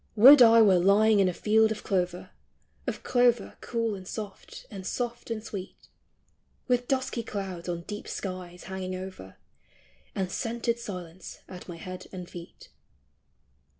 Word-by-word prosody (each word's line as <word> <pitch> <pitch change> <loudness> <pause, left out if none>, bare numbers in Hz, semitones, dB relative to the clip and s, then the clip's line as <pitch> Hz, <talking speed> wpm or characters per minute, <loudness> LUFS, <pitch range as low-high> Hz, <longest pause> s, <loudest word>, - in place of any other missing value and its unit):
Would 260 +6 +10
I 230 -1 +8
were 190 -4 +5
lying 205 +3 +5
in 190 -2 +4
a - - 0
field 220 +5 +3
of 215 - -4
clover, 180 -2 -1 0.6
Of - - -3
clover 245 -1 +2
cool 230 -2 -1
and 190 -2 -8
soft, 210 -3 -8
and 195 -3 -7
soft 240 +5 -4
and 220 -2 -3
sweet, 195 -4 -8 0.8
With 245 -1 +1
dusky 260 -3 -1
clouds 190 -5 -5
on 170 -1 -2
deep 210 +3 -7
skies 180 -2 -6
hanging 190 -1 -5
over, 185 - -8 0.8
And 190 -2 -2
scented 235 +2 -1
silence 180 -5 -8
at 180 0 -10
my 170 - -7
head 185 +2 -8
and 180 -2 -7
feet. 175 -1 -11
200 Hz, 150 wpm, -28 LUFS, 185-230 Hz, 0.8 s, Would